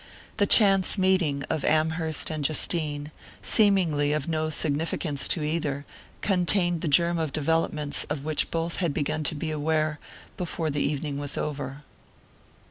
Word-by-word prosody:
The 205 -2 +2
chance 195 -2 +5
meeting 185 -7 +1
of 155 - -2
Amherst 160 +1 +1
and 155 -2 -4
Justine, 150 0 0 0.3
seemingly 175 -9 +3
of 150 -2 -2
no 155 -1 -1
significance 150 -1 -1
to 160 - +1
either, 150 -2 -2 0.4
contained 175 -3 +1
the - - -2
germ 170 +3 +3
of 160 -3 -2
developments 150 -1 0
of 150 -1 -5
which 155 -1 0
both 165 0 -3
had 170 -6 -1
begun 155 +1 -2
to 155 - -1
be 155 +2 -4
aware 155 0 -1 0.4
before 165 -3 -3
the 145 0 -2
evening 145 -1 -2
was 145 -1 -3
over. 145 -1 -5
155 Hz, 145 wpm, -26 LUFS, 145-170 Hz, 0.4 s, chance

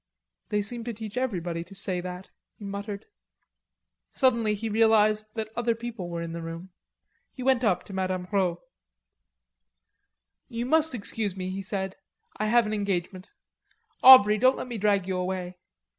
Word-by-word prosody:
"They 210 -1 0
seem 235 +3 -3
to 240 - -3
teach 215 0 -8
everybody 180 -10 -2
to 190 +3 -14
say 185 -2 -1
that," 180 +1 -8 0.3
he 205 - -10
muttered. 200 0 -6 1.1
Suddenly 235 -5 +2
he 220 +2 -4
realized 215 -1 +3
that 220 -1 -4
other 235 -1 0
people 230 -6 -6
were 170 -1 -4
in 165 - -5
the 170 0 -5
room. 165 +3 -7 0.6
He 255 - -8
went 260 -1 +2
up 210 -6 +2
to 200 - -11
Mme. 185 -1 -2
Rod. 185 -4 +1 1.9
"You 235 +1 -3
must 315 +1 +2
excuse 205 -3 -3
me," 185 0 -4
he 195 +1 -4
said, 190 0 -4 0.4
"I 215 - -1
have 235 +1 +4
an 215 - -3
engagement.... 190 -2 -3 0.7
Aubrey, 215 -5 +9
don't 255 +2 +4
let - - -5
me 235 -3 -5
drag 200 -2 +2
you 190 -1 -1
away. 180 0 -4
205 Hz, 160 wpm, -27 LUFS, 185-230 Hz, 1.9 s, Aubrey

